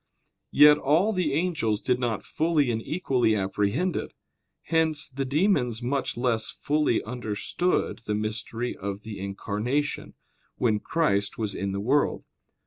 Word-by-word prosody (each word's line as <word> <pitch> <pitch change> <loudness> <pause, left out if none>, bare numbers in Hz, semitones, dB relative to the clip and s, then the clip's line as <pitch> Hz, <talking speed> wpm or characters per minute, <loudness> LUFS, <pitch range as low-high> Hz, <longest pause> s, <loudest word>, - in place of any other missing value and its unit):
Yet 150 +1 +7
all 170 +10 +2
the 180 -6 0
angels 150 - 0
did 125 +1 0
not 120 -5 -2
fully 155 -5 +1
and 115 -1 -2
equally 130 -7 +1
apprehend 105 - 0
it; - - -4 0.5
hence 160 -2 +1
the 135 -1 -4
demons 135 - +1
much 130 0 -1
less 120 -3 +1
fully 150 -5 0
understood 120 - -2
the 105 - 0
mystery 110 +3 -3
of 100 +1 -5
the 110 -3 -7
Incarnation, 105 +8 -2 0.4
when 110 -4 +1
Christ 100 -10 0
was 105 -3 -2
in 100 0 -3
the 100 - -3
world. 135 +8 +1
125 Hz, 135 wpm, -26 LUFS, 105-150 Hz, 0.5 s, Yet